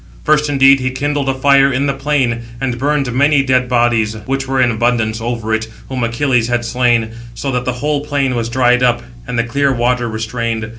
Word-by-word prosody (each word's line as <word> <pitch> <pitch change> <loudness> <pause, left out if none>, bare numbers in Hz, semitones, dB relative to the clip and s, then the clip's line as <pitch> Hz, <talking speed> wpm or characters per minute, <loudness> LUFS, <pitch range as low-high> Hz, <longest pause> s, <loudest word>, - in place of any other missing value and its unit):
First, 150 -1 +2
indeed, 135 -1 +5
he 130 0 -1
kindled 140 +1 -2
a - - +1
fire 140 0 +4
in 135 +2 0
the 140 - 0
plain, 135 -4 0 0.2
and 125 -2 -3
burned 140 -2 0
many 140 +2 +3
dead 130 -2 +1
bodies, 120 -3 +1
which 135 0 -2
were 135 0 -1
in 125 -1 +3
abundance, 115 -1 0
over 115 -1 -3
it, 110 0 -1 0.2
whom 130 -2 -3
Achilles 115 0 +1
had 120 -1 -1
slain; 120 -1 +1 0.3
so 135 - -3
that 125 -1 -2
the 125 - -1
whole 150 -1 0
plain 140 -3 -1
was 115 -1 -2
dried 125 0 +2
up, 120 -1 +2 0.2
and 125 -1 -3
the 115 - +2
clear 140 +4 0
water 120 -1 0
restrained. 115 +1 -3
125 Hz, 205 wpm, -16 LUFS, 115-135 Hz, 0.3 s, indeed